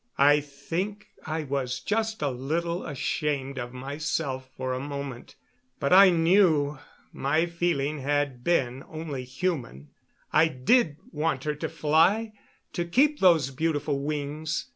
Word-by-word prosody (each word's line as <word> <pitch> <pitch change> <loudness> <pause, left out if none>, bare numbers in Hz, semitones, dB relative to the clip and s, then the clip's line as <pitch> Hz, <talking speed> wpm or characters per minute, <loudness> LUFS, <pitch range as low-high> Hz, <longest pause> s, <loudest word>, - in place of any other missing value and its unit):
I 145 +1 +6
think 170 +9 -5 0.2
I 160 0 -2
was 130 -3 -2
just 220 -2 -1
a 145 - +2
little 165 +7 -2
ashamed 140 -1 -2
of 120 -1 -5
myself 135 0 -3
for 130 0 -2
a 130 - -2
moment. 140 -3 -6 0.4
But - - +1
I 195 +1 +9
knew 165 -5 +3 0.3
my 155 +5 +1
feeling 170 -4 -1
had 140 -2 -1
been 135 -6 0
only 155 -5 -5
human. 130 - -4 0.4
I 160 +1 +5
did 155 - +2
want 150 -3 -1
her 150 - -1
to 150 - -4
fly, 165 +8 +2 0.4
to 175 - -1
keep 285 - +2
those 165 -7 +4
beautiful 145 0 -1
wings. 150 +2 -3
150 Hz, 135 wpm, -27 LUFS, 135-170 Hz, 0.4 s, I